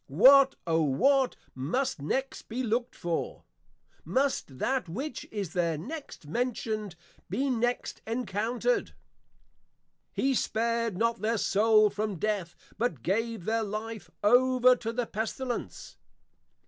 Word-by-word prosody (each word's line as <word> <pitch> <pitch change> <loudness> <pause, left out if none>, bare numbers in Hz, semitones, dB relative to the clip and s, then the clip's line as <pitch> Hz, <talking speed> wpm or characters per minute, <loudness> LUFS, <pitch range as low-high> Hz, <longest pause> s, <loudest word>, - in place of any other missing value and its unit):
_ - - -50
What, 265 - +7
O 165 -1 +2
what 260 - +3 0.2
must 170 - -1
next 265 - -3
be 245 +3 -2
looked 235 +2 -1
for? 170 -1 -3 0.6
Must 260 - -1
that 255 - -1
which 260 - -5
is 200 -6 -4
there 170 -3 +1
next 280 - -8
mentioned, 215 0 -2 0.3
be 265 +8 0
next 245 0 -1
encountered? 235 - -1 1.2
_He 270 0 +2
spared 230 -3 0
not 230 +2 0
their 225 +2 +1
soul 215 +1 +4
from 210 0 -2
death, 190 -2 -2 0.2
but 180 - -1
gave 225 0 -1
their 225 +1 +1
life 215 +1 -5
over 255 +3 +5
to 230 -2 -4
the 240 +1 -1
Pestilence. 225 - -4
225 Hz, 120 wpm, -29 LUFS, 200-250 Hz, 1.2 s, What